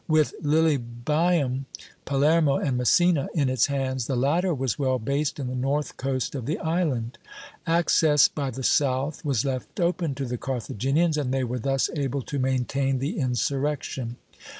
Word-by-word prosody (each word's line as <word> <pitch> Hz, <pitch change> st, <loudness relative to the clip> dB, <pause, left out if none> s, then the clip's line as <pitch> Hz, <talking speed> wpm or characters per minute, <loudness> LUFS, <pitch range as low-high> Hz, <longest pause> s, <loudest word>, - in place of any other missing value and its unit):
With 155 Hz, -2 st, +3 dB
Lilybæum, 145 Hz, 0 st, +1 dB, 0.4 s
Palermo, 145 Hz, +1 st, +3 dB
and 135 Hz, -3 st, 0 dB
Messina 150 Hz, +5 st, +3 dB
in 140 Hz, -5 st, +2 dB
its 130 Hz, -3 st, +2 dB
hands, 130 Hz, -3 st, -2 dB
the 135 Hz, -, -1 dB
latter 160 Hz, +9 st, +1 dB
was 135 Hz, -4 st, -2 dB
well 130 Hz, -2 st, +1 dB
based 140 Hz, +5 st, -1 dB
in 135 Hz, -, -3 dB
the 125 Hz, -, -4 dB
north 135 Hz, +4 st, -1 dB
coast 130 Hz, -1 st, -2 dB
of 130 Hz, -5 st, -5 dB
the 155 Hz, -, -1 dB
island. 145 Hz, -9 st, -1 dB, 0.5 s
Access 165 Hz, -3 st, +4 dB
by 140 Hz, -3 st, -3 dB
the 130 Hz, +1 st, -6 dB
south 135 Hz, +2 st, +1 dB
was 140 Hz, -7 st, 0 dB
left 130 Hz, -, -4 dB
open 170 Hz, -4 st, 0 dB
to 135 Hz, -, -3 dB
the 125 Hz, -1 st, -4 dB
Carthaginians, 135 Hz, +6 st, 0 dB
and 140 Hz, -4 st, -1 dB
they 135 Hz, 0 st, 0 dB
were 125 Hz, 0 st, -3 dB
thus 135 Hz, +3 st, +1 dB
able 140 Hz, -2 st, -2 dB
to 140 Hz, -, -4 dB
maintain 130 Hz, +1 st, 0 dB
the 145 Hz, -, -3 dB
insurrection. 130 Hz, -1 st, -2 dB
135 Hz, 160 wpm, -25 LUFS, 130-150 Hz, 0.5 s, Access